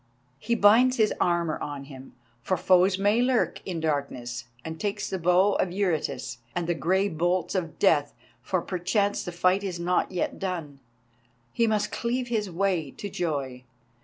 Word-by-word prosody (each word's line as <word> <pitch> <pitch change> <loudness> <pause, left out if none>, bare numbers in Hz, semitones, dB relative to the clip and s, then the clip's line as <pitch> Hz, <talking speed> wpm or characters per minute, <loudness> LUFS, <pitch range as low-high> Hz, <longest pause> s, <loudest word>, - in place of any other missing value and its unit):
He 235 +7 0
binds 235 +5 +5
his 215 -2 +3
armour 170 -2 +1
on 145 -1 -5
him, 135 -1 -12 0.3
for 185 +8 0
foes 185 +1 +4
may 205 +4 +3
lurk 250 -1 +1
in 175 -3 -3
darkness, 140 -6 -3 0.2
and 160 0 -6
takes 205 0 -2
the 190 - -3
Bow 180 +4 +4
of 180 - +1
Eurytus, 175 -9 -2 0.2
and 175 - -1
the 175 - +1
grey 190 +4 +1
bolts 175 +1 0
of 175 -5 -3
death; 150 -7 +2 0.3
for 185 -3 -1
perchance 200 +3 0
the 175 - -5
fight 180 +3 +2
is 180 -3 -4
not 175 +1 +1
yet 180 - -2
done, 165 -7 -4 0.7
he 230 - +2
must 210 -1 0
cleave 245 +1 -2
his 215 -4 -1
way 180 -4 0
to 200 +8 -8
joy. 140 -7 -3
180 Hz, 165 wpm, -26 LUFS, 160-205 Hz, 0.7 s, binds